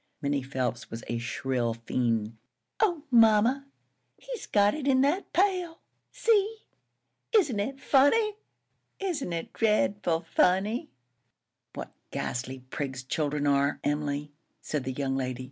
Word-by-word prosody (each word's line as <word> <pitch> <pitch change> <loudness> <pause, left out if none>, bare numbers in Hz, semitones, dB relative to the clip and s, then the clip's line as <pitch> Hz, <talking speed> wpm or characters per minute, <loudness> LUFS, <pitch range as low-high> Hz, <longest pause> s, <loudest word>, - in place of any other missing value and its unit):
Minnie 140 -1 0
Phelps 125 -2 -3
was 115 0 -7
a 120 - -2
shrill 120 0 -1
fiend. 115 -1 -1 0.4
"Oh, 350 -9 +2
mamma, 230 +4 +5 0.5
he's - - -7
got 205 0 +4
it 295 -3 -4
in 260 -1 +4
that 300 +8 +1
pail! 360 -3 +1 0.3
See! 440 -1 +1 0.7
Isn't 280 - +2
it 270 +7 -3
funny? 405 +12 +3 0.6
Isn't 340 - -2
it 165 -1 -4
dreadful 205 -6 +1
funny?" 190 +8 +1 0.9
"What - - -6 0.2
ghastly 130 +1 -4
prigs 135 -3 -4
children 145 +2 -1
are, 140 0 +2
Emily!" 145 0 -1 0.3
said 150 -4 -3
the 130 - -2
young 135 0 -1
lady. 130 -2 -2
170 Hz, 125 wpm, -28 LUFS, -, 0.9 s, mamma